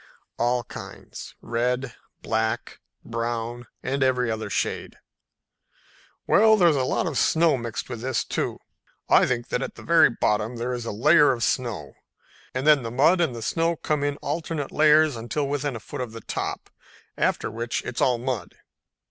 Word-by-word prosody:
"All 120 Hz, +1 st, +1 dB
kinds, -, -, -10 dB
red, 125 Hz, +2 st, -1 dB, 0.3 s
black, 110 Hz, 0 st, -2 dB, 0.3 s
brown 115 Hz, +1 st, -3 dB, 0.2 s
and 135 Hz, +2 st, -2 dB
every 125 Hz, -3 st, +2 dB
other 110 Hz, -1 st, -4 dB
shade." -, -, -2 dB, 1.3 s
"Well, 220 Hz, +1 st, +5 dB
there's 170 Hz, -5 st, +5 dB
a 135 Hz, -, +1 dB
lot -, -, 0 dB
of -, -, -1 dB
snow 165 Hz, -1 st, +3 dB
mixed 120 Hz, -2 st, -5 dB
with 120 Hz, -3 st, -6 dB
this, 130 Hz, +1 st, -1 dB
too. -, -, -2 dB, 0.5 s
I -, -, +6 dB
think 120 Hz, -2 st, -2 dB
that 125 Hz, -, -1 dB
at -, -, -5 dB
the -, -, -11 dB
very 170 Hz, 0 st, +6 dB
bottom 110 Hz, 0 st, 0 dB
there 120 Hz, +2 st, -3 dB
is 120 Hz, -1 st, -4 dB
a -, -, -2 dB
layer 145 Hz, +8 st, +5 dB
of 120 Hz, -3 st, -2 dB
snow, 120 Hz, -5 st, -1 dB, 0.6 s
and 130 Hz, +2 st, -3 dB
then 150 Hz, -2 st, +6 dB
the 115 Hz, -, -4 dB
mud 150 Hz, +9 st, +4 dB
and 150 Hz, -8 st, 0 dB
the 115 Hz, -, -6 dB
snow 165 Hz, +7 st, +1 dB
come 150 Hz, -2 st, -1 dB
in 145 Hz, 0 st, -1 dB
alternate 160 Hz, -3 st, -3 dB
layers 155 Hz, -1 st, +5 dB
until 120 Hz, +5 st, -2 dB
within 145 Hz, -1 st, -2 dB
a -, -, -5 dB
foot 110 Hz, -, -7 dB
of 120 Hz, -3 st, -5 dB
the 115 Hz, -, -8 dB
top, -, -, -4 dB, 0.4 s
after -, -, 0 dB
which 115 Hz, +2 st, -3 dB
it's 120 Hz, -1 st, -4 dB
all 125 Hz, -2 st, +3 dB
mud. 120 Hz, -6 st, -4 dB
125 Hz, 175 wpm, -25 LUFS, 115-145 Hz, 1.3 s, I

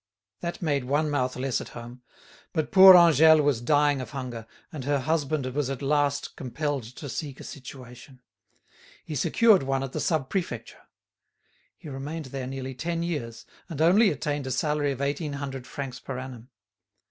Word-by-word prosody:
That 170 Hz, +1 st, -5 dB
made 140 Hz, -5 st, 0 dB
one 145 Hz, +3 st, 0 dB
mouth 130 Hz, -3 st, 0 dB
less 130 Hz, 0 st, -1 dB
at -, -, -9 dB
home; 120 Hz, +1 st, -10 dB, 0.5 s
but 155 Hz, -2 st, -1 dB
poor 190 Hz, -1 st, +10 dB
Angèle 160 Hz, -2 st, +7 dB
was 140 Hz, -5 st, +1 dB
dying 145 Hz, +1 st, +2 dB
of 130 Hz, -, -7 dB
hunger, 125 Hz, -5 st, -6 dB, 0.3 s
and 145 Hz, -4 st, -5 dB
her 145 Hz, +2 st, +1 dB
husband 155 Hz, -1 st, -1 dB
was 145 Hz, -1 st, -1 dB
at 135 Hz, +1 st, -5 dB
last 145 Hz, 0 st, 0 dB
compelled 145 Hz, +2 st, -3 dB
to 145 Hz, -, -8 dB
seek 135 Hz, +1 st, -5 dB
a -, -, -9 dB
situation. 130 Hz, -1 st, -11 dB, 0.9 s
He -, -, -6 dB
secured 190 Hz, -, +4 dB
one 135 Hz, 0 st, -1 dB
at 135 Hz, -, -5 dB
the -, -, -4 dB
Sub 155 Hz, -6 st, 0 dB
Prefecture. 150 Hz, -, -5 dB, 0.9 s
He -, -, -12 dB
remained 145 Hz, +3 st, -6 dB
there 130 Hz, -2 st, -4 dB
nearly 130 Hz, 0 st, -5 dB
ten 170 Hz, +6 st, -3 dB
years, 125 Hz, -10 st, -4 dB, 0.2 s
and 160 Hz, -4 st, -6 dB
only 190 Hz, +7 st, +5 dB
attained 145 Hz, -2 st, -3 dB
a -, -, -3 dB
salary 145 Hz, +2 st, 0 dB
of 135 Hz, 0 st, -5 dB
eighteen 145 Hz, +2 st, -2 dB
hundred 135 Hz, -3 st, -6 dB
francs 130 Hz, -3 st, -6 dB
per 135 Hz, -, -6 dB
annum. 130 Hz, -2 st, -8 dB
140 Hz, 170 wpm, -26 LUFS, 130-155 Hz, 0.9 s, poor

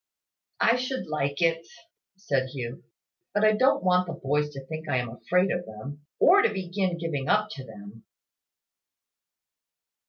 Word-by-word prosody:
"I 230 Hz, -, +5 dB
should 255 Hz, +1 st, -3 dB
like 140 Hz, 0 st, -1 dB
it," 165 Hz, 0 st, +1 dB, 0.5 s
said 140 Hz, -9 st, -1 dB
Hugh, 130 Hz, +3 st, -6 dB, 0.5 s
"but 205 Hz, -, +2 dB
I 215 Hz, -, +6 dB
don't 255 Hz, +1 st, +3 dB
want 180 Hz, 0 st, +3 dB
the 170 Hz, -, -4 dB
boys 150 Hz, 0 st, 0 dB
to 135 Hz, -1 st, -8 dB
think 155 Hz, +1 st, -7 dB
I 130 Hz, -, +2 dB
am 120 Hz, -2 st, -2 dB
afraid 180 Hz, +10 st, +1 dB
of 175 Hz, -, -3 dB
them; 140 Hz, +7 st, -9 dB
or 395 Hz, +3 st, +6 dB
to -, -, +3 dB
begin 185 Hz, -1 st, -2 dB
giving 155 Hz, -5 st, -3 dB
up 210 Hz, 0 st, +3 dB
to 135 Hz, -8 st, -7 dB
them." 110 Hz, -1 st, -12 dB
160 Hz, 155 wpm, -27 LUFS, 135-185 Hz, 0.5 s, I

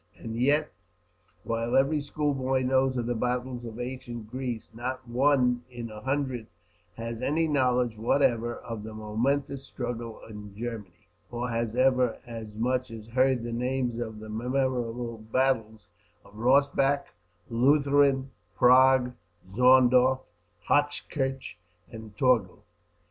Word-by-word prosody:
And 115 Hz, -1 st, -6 dB
yet, 145 Hz, +6 st, +2 dB, 0.7 s
while 115 Hz, +1 st, -1 dB
every 140 Hz, +3 st, +3 dB
school 145 Hz, 0 st, -1 dB
boy 130 Hz, -1 st, 0 dB
knows 130 Hz, 0 st, +2 dB
of 120 Hz, -, -1 dB
the 120 Hz, -, 0 dB
battles 125 Hz, +1 st, -2 dB
of 115 Hz, 0 st, -8 dB
ancient 120 Hz, -3 st, -6 dB
Greece, 125 Hz, -4 st, -4 dB
not 125 Hz, +2 st, -5 dB
one 125 Hz, -1 st, +2 dB
in 120 Hz, -2 st, -7 dB
a 105 Hz, 0 st, -9 dB
hundred 130 Hz, -4 st, -2 dB, 0.5 s
has 115 Hz, 0 st, -5 dB
any 160 Hz, +3 st, +1 dB
knowledge 125 Hz, -5 st, +1 dB
whatever 120 Hz, -1 st, +2 dB
of 115 Hz, -2 st, -7 dB
the 110 Hz, 0 st, -8 dB
momentous 130 Hz, +6 st, -1 dB
struggle 120 Hz, -3 st, -5 dB
in 105 Hz, -2 st, -10 dB
Germany, 105 Hz, -7 st, -7 dB, 0.2 s
or 120 Hz, +1 st, -3 dB
has 115 Hz, -1 st, -2 dB
ever 130 Hz, -2 st, +3 dB
as 115 Hz, -2 st, -7 dB
much 125 Hz, +3 st, 0 dB
as 110 Hz, -1 st, -10 dB
heard 130 Hz, 0 st, +2 dB
the 120 Hz, -, -4 dB
names 125 Hz, 0 st, -1 dB
of 110 Hz, -2 st, -5 dB
the 110 Hz, 0 st, -9 dB
memorable 120 Hz, 0 st, -2 dB
battles 110 Hz, -2 st, -1 dB, 0.4 s
of 100 Hz, -, -18 dB
Rossbach, 140 Hz, +4 st, +3 dB, 0.5 s
Leuthen, 140 Hz, +1 st, +3 dB, 0.2 s
Prague, 130 Hz, 0 st, +5 dB, 0.4 s
Zorndorf, 130 Hz, +1 st, +5 dB, 0.5 s
Hochkirch, 135 Hz, -4 st, -1 dB, 0.3 s
and 110 Hz, -2 st, -10 dB
Torgau. 125 Hz, -8 st, +2 dB
125 Hz, 125 wpm, -28 LUFS, 115-130 Hz, 0.7 s, Prague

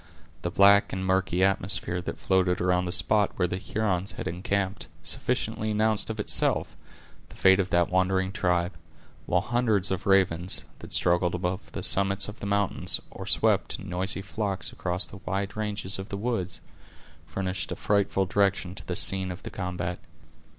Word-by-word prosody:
The 85 Hz, -, -2 dB
black 100 Hz, +2 st, +5 dB
and 95 Hz, 0 st, -3 dB
murky 95 Hz, -1 st, +1 dB
atmosphere 95 Hz, -2 st, +1 dB
that -, -, -5 dB
floated 95 Hz, -1 st, +1 dB
around 90 Hz, 0 st, +1 dB
the 90 Hz, -, -3 dB
spot 105 Hz, +2 st, +3 dB
where 90 Hz, -, +1 dB
the 90 Hz, +1 st, -3 dB
Hurons 100 Hz, -2 st, -1 dB
had -, -, -6 dB
encamped, 95 Hz, +1 st, -2 dB, 0.2 s
sufficiently 110 Hz, -, -1 dB
announced 110 Hz, 0 st, +1 dB
of 110 Hz, -1 st, -4 dB
itself, 105 Hz, -, +2 dB, 0.5 s
the -, -, -14 dB
fate 95 Hz, +1 st, +5 dB
of 95 Hz, -1 st, 0 dB
that 85 Hz, 0 st, +2 dB
wandering 95 Hz, +1 st, +1 dB
tribe; 90 Hz, -1 st, 0 dB, 0.5 s
while 90 Hz, -, +2 dB
hundreds 110 Hz, -4 st, +1 dB
of 95 Hz, +2 st, -3 dB
ravens, 95 Hz, -2 st, +2 dB
that -, -, -11 dB
struggled 85 Hz, 0 st, +2 dB
above 90 Hz, +2 st, -3 dB
the -, -, -5 dB
summits 100 Hz, 0 st, +2 dB
of 105 Hz, +1 st, -9 dB
the 100 Hz, -, -5 dB
mountains, 100 Hz, -1 st, 0 dB
or -, -, -8 dB
swept, -, -, +2 dB
in 95 Hz, -, -9 dB
noisy 95 Hz, +2 st, 0 dB
flocks, 100 Hz, -1 st, -2 dB
across 90 Hz, +1 st, -2 dB
the -, -, -10 dB
wide 100 Hz, +2 st, -3 dB
ranges 105 Hz, -3 st, -3 dB
of 95 Hz, +3 st, -7 dB
the 100 Hz, -, -4 dB
woods, 105 Hz, -4 st, -2 dB, 0.7 s
furnished 95 Hz, -1 st, -3 dB
a -, -, -2 dB
frightful 100 Hz, -1 st, +1 dB
direction 95 Hz, -1 st, +1 dB
to -, -, -8 dB
the 90 Hz, -, -2 dB
scene 95 Hz, +1 st, +3 dB
of 90 Hz, -1 st, -9 dB
the -, -, -7 dB
combat. 90 Hz, -1 st, -4 dB
95 Hz, 170 wpm, -27 LUFS, 90-100 Hz, 0.7 s, black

